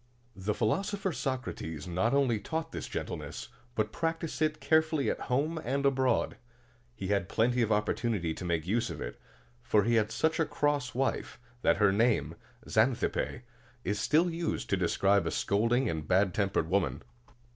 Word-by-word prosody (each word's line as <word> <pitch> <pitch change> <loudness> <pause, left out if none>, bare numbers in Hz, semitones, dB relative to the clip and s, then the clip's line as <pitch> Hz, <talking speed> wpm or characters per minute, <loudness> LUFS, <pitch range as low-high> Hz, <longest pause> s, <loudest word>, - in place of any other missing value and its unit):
The 100 +2 -2
philosopher 195 - 0
Socrates 125 - -4
not 90 +7 +1
only 135 -6 +2
taught 160 +7 -4
this - - -5
gentleness, - - -5 0.3
but 110 -1 0
practiced 165 0 -2
it 155 0 +1
carefully 160 -2 +2
at - - -4
home 150 +6 +1
and 140 +3 -1
abroad. 130 -3 +2 0.6
He 95 -4 -5
had 100 -2 +1
plenty 120 +2 +2
of 110 -1 +1
opportunity 105 -4 0
to 90 - -8
make 85 -3 -1
use 115 +6 0
of - - -6
it; - - -6 0.4
for 105 - +3
he 120 +3 +1
had 105 +1 -4
such 160 +6 +1
a 160 - +3
cross 145 -5 0
wife, 135 +1 -1 0.2
that - - +3
her 105 -1 +4
name, 100 - +2 0.3
Xan 115 +3 +3
thip´pe, 120 - -2 0.4
is 100 +1 -1
still 165 - +3
used 165 0 -3
to - - +4
describe 95 0 +2
a - - +1
scolding 115 +6 +1
and 80 -5 -3
bad 95 0 +3
tempered 100 -5 0
woman. 95 +2 0
115 Hz, 165 wpm, -30 LUFS, 100-145 Hz, 0.6 s, her